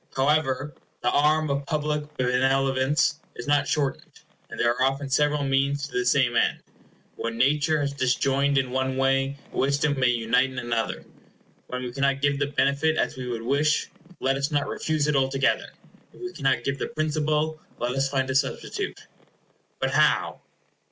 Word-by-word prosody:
However, 145 Hz, 0 st, +1 dB, 0.3 s
the 120 Hz, -, +2 dB
arm 150 Hz, +1 st, +2 dB
of 140 Hz, 0 st, -2 dB
public 150 Hz, -1 st, -2 dB
benevolence 135 Hz, +3 st, +2 dB, 0.2 s
is -, -, -7 dB
not 145 Hz, 0 st, +2 dB
shortened, 145 Hz, -3 st, -2 dB, 0.3 s
and -, -, -8 dB
there 120 Hz, -, +3 dB
are 125 Hz, -, -6 dB
often 135 Hz, +1 st, 0 dB
several 150 Hz, +1 st, +2 dB
means 140 Hz, +1 st, +1 dB
to -, -, -17 dB
the 125 Hz, 0 st, -1 dB
same 125 Hz, -2 st, +3 dB
end. -, -, +1 dB, 0.5 s
What 115 Hz, 0 st, -3 dB
nature 150 Hz, +5 st, +2 dB
has 140 Hz, 0 st, -1 dB
disjoined 135 Hz, +1 st, +1 dB
in 130 Hz, -2 st, 0 dB
one 130 Hz, 0 st, -1 dB
way, 135 Hz, +1 st, +1 dB
wisdom 140 Hz, +1 st, +1 dB
may 130 Hz, -, +3 dB
unite 125 Hz, +2 st, +2 dB
in 130 Hz, -, -10 dB
another. 120 Hz, -2 st, -2 dB, 0.6 s
When 125 Hz, 0 st, -4 dB
we 125 Hz, -, -4 dB
cannot 140 Hz, +1 st, 0 dB
give 140 Hz, 0 st, +1 dB
the 145 Hz, -, +1 dB
benefit 140 Hz, +2 st, +1 dB
as -, -, 0 dB
we 130 Hz, -1 st, -6 dB
would 115 Hz, -2 st, -4 dB
wish, 145 Hz, +5 st, +1 dB, 0.3 s
let 135 Hz, +1 st, +1 dB
us 140 Hz, +1 st, -1 dB
not 145 Hz, -2 st, 0 dB
refuse 155 Hz, -2 st, -1 dB
it 150 Hz, -1 st, +1 dB
altogether. 135 Hz, 0 st, +1 dB, 0.4 s
If -, -, -17 dB
we 365 Hz, 0 st, -6 dB
cannot 130 Hz, -3 st, 0 dB
give 135 Hz, +1 st, -2 dB
the -, -, -2 dB
principal, 155 Hz, 0 st, -1 dB, 0.2 s
let 120 Hz, +1 st, -2 dB
us 135 Hz, +1 st, 0 dB
find 135 Hz, -1 st, 0 dB
a -, -, -1 dB
substitute. 135 Hz, -, -2 dB, 0.7 s
But -, -, 0 dB
how? -, -, +2 dB
135 Hz, 170 wpm, -25 LUFS, 130-145 Hz, 0.7 s, there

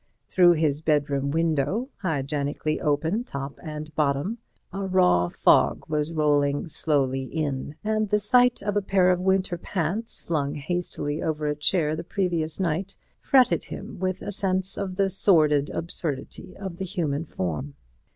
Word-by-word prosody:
Through 175 Hz, -2 st, +5 dB
his 155 Hz, -2 st, 0 dB
bedroom 145 Hz, -3 st, +1 dB
window, 165 Hz, -, 0 dB
hygienically 150 Hz, -3 st, -2 dB
open 160 Hz, +10 st, 0 dB
top 140 Hz, -, -6 dB
and 155 Hz, -1 st, -7 dB
bottom, 150 Hz, +9 st, 0 dB, 0.3 s
a 195 Hz, 0 st, -3 dB
raw 180 Hz, -, +3 dB
fog -, -, +3 dB
was 150 Hz, 0 st, -1 dB
rolling 145 Hz, -2 st, +1 dB
slowly 135 Hz, -4 st, 0 dB
in, 145 Hz, -1 st, -3 dB
and 215 Hz, -1 st, 0 dB
the 210 Hz, -, +3 dB
sight 245 Hz, +3 st, +3 dB
of 205 Hz, 0 st, -1 dB
a 205 Hz, -, +2 dB
pair 190 Hz, -2 st, +3 dB
of 180 Hz, -, +1 dB
winter 190 Hz, -1 st, +1 dB
pants, 190 Hz, +6 st, -3 dB
flung 145 Hz, -4 st, -2 dB
hastily 150 Hz, -1 st, -3 dB
over 155 Hz, -1 st, -2 dB
a 150 Hz, 0 st, 0 dB
chair 155 Hz, 0 st, +1 dB
the 160 Hz, -, -5 dB
previous 170 Hz, -4 st, -1 dB
night, 185 Hz, +2 st, -1 dB, 0.2 s
fretted 250 Hz, -, +3 dB
him -, -, -8 dB
with 185 Hz, 0 st, -2 dB
a -, -, -4 dB
sense 190 Hz, -1 st, +1 dB
of 190 Hz, -2 st, -4 dB
the 195 Hz, 0 st, +2 dB
sordid 155 Hz, -7 st, +3 dB
absurdity 165 Hz, 0 st, -4 dB
of 190 Hz, -3 st, -6 dB
the 190 Hz, -, -3 dB
human 165 Hz, -5 st, -2 dB
form. 80 Hz, -, -4 dB
160 Hz, 150 wpm, -25 LUFS, 145-190 Hz, 0.3 s, Through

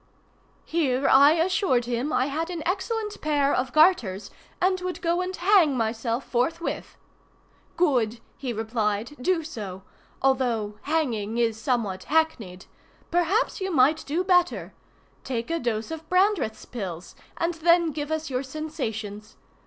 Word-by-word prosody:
Here 280 Hz, -5 st, +1 dB
I 280 Hz, +3 st, +7 dB
assured 330 Hz, -7 st, +1 dB
him 245 Hz, +5 st, -2 dB
I 255 Hz, -, +2 dB
had 315 Hz, +4 st, -2 dB
an 340 Hz, -3 st, -4 dB
excellent 415 Hz, +4 st, -2 dB
pair 290 Hz, -2 st, +2 dB
of 255 Hz, -1 st, 0 dB
garters, 280 Hz, -, +3 dB, 0.3 s
and 370 Hz, 0 st, +1 dB
would 365 Hz, 0 st, -4 dB
go 345 Hz, +1 st, 0 dB
and 370 Hz, +1 st, -3 dB
hang 355 Hz, -7 st, +4 dB
myself 230 Hz, +2 st, -1 dB
forthwith. 325 Hz, +8 st, -2 dB, 0.8 s
"Good!" 245 Hz, -10 st, +2 dB, 0.2 s
he 260 Hz, -3 st, -4 dB
replied, 220 Hz, +2 st, -2 dB
"do 340 Hz, +3 st, +1 dB
so;—although 220 Hz, -, -3 dB
hanging 240 Hz, -9 st, -1 dB
is 225 Hz, -2 st, 0 dB
somewhat 220 Hz, -9 st, -1 dB
hacknied. 255 Hz, -, 0 dB, 0.5 s
Perhaps 350 Hz, +6 st, +1 dB
you 380 Hz, -, -1 dB
might 300 Hz, +1 st, +3 dB
do 325 Hz, +6 st, 0 dB
better. 360 Hz, -2 st, +2 dB, 0.5 s
Take 235 Hz, +2 st, -3 dB
a 335 Hz, -, 0 dB
dose 230 Hz, -1 st, -2 dB
of 320 Hz, 0 st, -7 dB
Brandreth's 365 Hz, -, +1 dB
pills, 185 Hz, -7 st, -6 dB, 0.2 s
and 335 Hz, 0 st, 0 dB
then 335 Hz, 0 st, +3 dB
give 295 Hz, 0 st, -4 dB
us 315 Hz, 0 st, -2 dB
your 255 Hz, -2 st, -1 dB
sensations. 225 Hz, -8 st, -5 dB
280 Hz, 135 wpm, -25 LUFS, 230-335 Hz, 0.8 s, I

